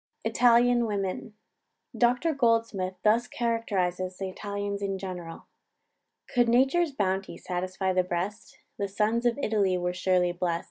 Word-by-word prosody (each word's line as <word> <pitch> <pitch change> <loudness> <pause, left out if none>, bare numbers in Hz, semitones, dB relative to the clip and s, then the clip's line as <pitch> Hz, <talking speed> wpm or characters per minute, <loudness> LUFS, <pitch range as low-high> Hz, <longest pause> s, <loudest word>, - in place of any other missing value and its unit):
ITALIAN 240 0 +4
WOMEN. 205 +1 -3 0.6
Dr 250 +7 +2
Goldsmith 230 -7 +1
thus 230 +3 +3
characterises 190 -6 -1
the 190 -1 -4
Italians 200 +1 -4
in 195 -1 -2
general: 180 -3 -7 0.8
"Could 245 -2 +2
nature's 270 +7 +3
bounty 195 -5 -2
satisfy 185 +1 -2
the 185 - +3
breast, 185 +5 -4 0.2
The 200 - 0
sons 220 +4 +1
of 235 - 0
Italy 205 -8 +1
were 180 0 -1
surely 180 -1 +2
blest. 175 -1 -1
200 Hz, 130 wpm, -27 LUFS, 185-235 Hz, 0.8 s, ITALIAN